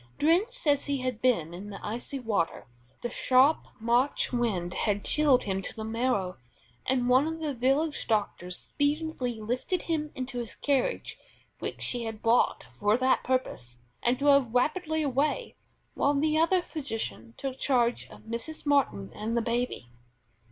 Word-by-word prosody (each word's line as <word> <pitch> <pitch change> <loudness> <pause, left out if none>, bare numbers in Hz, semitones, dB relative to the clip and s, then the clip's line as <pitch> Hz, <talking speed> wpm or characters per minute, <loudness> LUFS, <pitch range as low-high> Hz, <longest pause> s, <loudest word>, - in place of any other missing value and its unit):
Drenched 395 +11 +2
as 285 -2 +3
he 280 -2 -1
had 255 -3 -3
been 175 -11 +2
in 195 +4 -7
the 200 - -7
icy 240 +6 -4
river, 215 -10 -1 0.4
the 240 - -2
sharp 260 +5 +4
March 240 +5 +1
wind 200 -8 0
had 205 0 0
chilled 290 -4 +4
him 195 -1 -1
to - - -7
the 220 - -5
marrow, 220 -5 -1 0.5
and 250 -1 +1
one 260 +4 +5
of 320 0 -4
the 305 -3 -2
village 270 +5 +1
doctors 200 -4 0
speedily 285 -5 -1
lifted 250 - -2
him 310 -2 -1
into 255 -1 -4
his 235 -2 -6
carriage 285 - -1 0.4
which - - -5
he 240 -2 -3
had 220 -1 -6
brought 230 - +3
for 205 +2 +3
that 260 +1 +2
purpose, 185 - -2 0.2
and 245 +1 +2
drove 280 -4 +3
rapidly 315 +4 +1
away, 290 - 0 0.4
while 285 +1 +2
the 305 +2 +2
other 335 +3 +3
physician 225 - -5
took 265 -1 -4
charge 245 -3 +1
of - - -13
Mrs. 235 +9 -6
Martin 260 - +1
and 225 +3 -2
the - - +3
baby. 235 - -2
255 Hz, 160 wpm, -28 LUFS, 225-290 Hz, 0.5 s, one